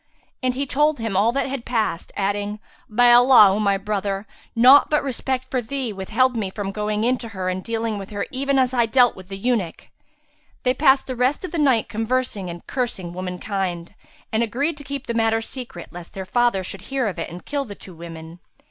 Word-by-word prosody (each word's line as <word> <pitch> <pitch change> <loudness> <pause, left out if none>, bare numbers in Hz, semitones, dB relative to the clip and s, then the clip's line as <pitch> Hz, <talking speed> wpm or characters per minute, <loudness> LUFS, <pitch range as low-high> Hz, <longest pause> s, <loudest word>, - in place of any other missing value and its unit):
And 255 -1 0
he 275 +2 -1
told 295 +2 +2
him 225 -4 -3
all 210 +5 +4
that 275 - 0
had 270 -2 -4
passed, 215 -9 -2
adding, 205 +1 -1 0.3
"By 240 +2 +5
Allah, 245 -4 +8
O 205 - -1
my 200 -2 +2
brother, 200 0 -2 0.3
naught 255 +5 +7
but 300 -1 +2
respect 260 -1 -2
for 255 - +1
thee 245 -1 -3
withheld 250 +7 +1
me 210 -4 -1
from 195 0 -4
going 210 +1 -2
in 250 +1 +2
to 230 - -7
her 185 0 -1
and 185 0 -3
dealing 225 -2 -2
with 195 - -8
her 205 -1 -3
even 275 +1 0
as 260 -1 +2
I 240 -2 +3
dealt 245 +1 +4
with 185 -1 -12
the 195 0 -6
eunuch!" 205 -6 -2 0.7
They 250 -2 +3
passed 270 -1 +4
the 255 - -4
rest 255 +8 +1
of - - -7
the 335 - -2
night 265 -7 +3
conversing 225 -3 -2
and 170 0 -8
cursing 215 -9 -3
womankind, 180 -1 -4 0.4
and 220 - +1
agreed 270 +8 0
to 285 - -10
keep 280 0 -5
the 235 - -3
matter 225 -1 +2
secret, 225 -6 -7
lest 175 0 -10
their 190 -1 -5
father 240 -2 +1
should 190 +1 -7
hear 270 -2 0
of 190 -5 -3
it - - -4
and 175 +2 -10
kill 285 -1 -2
the 205 -4 -9
two 185 - -13
women. 165 0 -10
225 Hz, 215 wpm, -22 LUFS, 195-255 Hz, 0.7 s, Allah